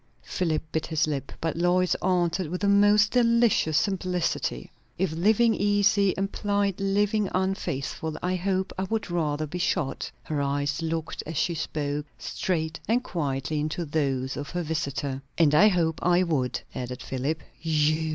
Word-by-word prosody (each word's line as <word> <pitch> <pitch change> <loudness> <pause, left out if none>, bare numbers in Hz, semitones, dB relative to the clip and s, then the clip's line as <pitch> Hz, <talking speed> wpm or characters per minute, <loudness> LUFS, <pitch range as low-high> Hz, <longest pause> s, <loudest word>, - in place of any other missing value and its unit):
Philip 165 -4 -1
bit 160 - -1
his 160 -2 +1
lip; 145 -3 -3
but 165 -1 -2
Lois 175 +2 +2
answered 180 -1 +1
with 180 +2 -4
the 200 - +2
most 205 +1 +5
delicious 235 -9 +3
simplicity, 180 - -1 0.3
"If 185 -2 0
living 220 +7 +3
easy 205 -1 +3
implied 200 0 0
living 205 +1 +1
unfaithful, 160 -4 -2
I 180 +1 0
hope 185 +1 -1
I 190 - 0
would 220 -2 -3
rather 155 -3 0
be 175 +4 -5
shot." 175 -5 -1
Her 150 -2 -2
eyes 140 +2 -1
looked, 165 0 -3
as 160 -1 -4
she 170 +2 +1
spoke, 150 -2 -3
straight 160 -3 -2
and 240 +4 +2
quietly 150 - -2
into 155 +3 -2
those 135 -4 -1
of 145 - -5
her 175 -1 -2
visitor. 140 -4 -2 0.2
"And 155 -3 +4
I 185 +8 +7
hope 170 -5 +1
I 180 +1 +4
would," 140 -8 0
added 125 0 -5
Philip. 140 +4 -2 0.2
"_You? 155 0 +1
170 Hz, 155 wpm, -26 LUFS, 150-195 Hz, 0.3 s, I